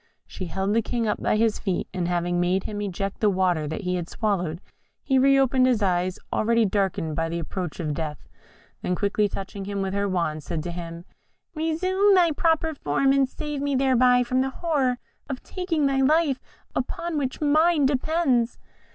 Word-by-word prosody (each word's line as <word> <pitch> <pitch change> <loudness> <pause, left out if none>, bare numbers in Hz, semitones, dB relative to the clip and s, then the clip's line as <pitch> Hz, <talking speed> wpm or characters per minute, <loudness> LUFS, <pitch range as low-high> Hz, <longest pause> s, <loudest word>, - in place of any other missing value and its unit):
She 185 - -7
held 190 +4 -1
the 230 - +3
King 230 0 -2
up 210 - -1
by - - +1
his 225 -1 +1
feet, 190 -4 -2
and 180 -2 -1
having 175 0 0
made 180 +2 +1
him 205 -1 -4
eject 195 0 -3
the 210 - +3
water 180 -5 +1
that 160 - -4
he 180 -1 -1
had 175 -1 -5
swallowed, 180 -7 -1 0.4
he 265 -2 +2
reopened 270 -1 +4
his 235 -5 +2
eyes, 180 -1 +1 0.2
already 230 +1 +2
darkened 190 -6 -1
by 165 +1 -1
the 170 - -3
approach 175 +1 -5
of 155 -3 -2
death, 150 -1 -5 0.5
then 180 - -1
quickly 205 +2 +1
touching 195 +1 -6
him 200 0 -2
with 190 0 -3
her 200 0 0
wand, 170 -4 -1
said 155 +1 -4
to 175 - -4
him, 170 0 -7 0.5
"Resume 370 +6 +2
thy 345 -3 +4
proper 320 0 +1
form, 270 - +1
and 275 -1 +3
save 295 -1 -5
me 285 -1 0
thereby 255 -2 +4
from 255 +1 +1
the 265 - 0
horror 270 -5 0 0.3
of 265 -2 -5
taking 350 -5 -1
thy 270 -1 +2
life, 295 -1 +3 0.4
upon 340 -1 -3
which 260 -2 -3
mine 310 +1 +3
depends." 265 -3 +1
220 Hz, 185 wpm, -25 LUFS, 180-275 Hz, 0.5 s, reopened